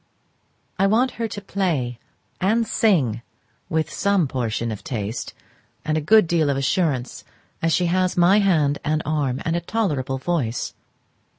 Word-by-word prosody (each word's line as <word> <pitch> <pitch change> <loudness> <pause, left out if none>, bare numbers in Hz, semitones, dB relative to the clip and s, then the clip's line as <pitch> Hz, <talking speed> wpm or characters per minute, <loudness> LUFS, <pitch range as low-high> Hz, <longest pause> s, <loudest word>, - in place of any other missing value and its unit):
I 195 - +4
want 240 +5 +2
her 230 - +1
to 205 -1 -7
play 160 - -2 0.4
and 220 +5 +2
sing 145 - +2 0.5
with 160 0 -1
some 200 -6 +2
portion 115 -3 -2
of 105 - -7
taste 115 -6 -4 0.5
and 155 - 0
a 155 - 0
good 215 +7 +5
deal 160 -3 +1
of 140 - 0
assurance, 135 -3 -1 0.4
as 165 - +1
she 180 - +2
has 185 +1 +1
my 180 +4 +5
hand 155 -8 +2
and 155 +1 0
arm 145 -4 -1
and 165 - 0
a 170 - -1
tolerable 150 - -1
voice. 130 -6 -2
160 Hz, 155 wpm, -22 LUFS, 130-190 Hz, 0.5 s, good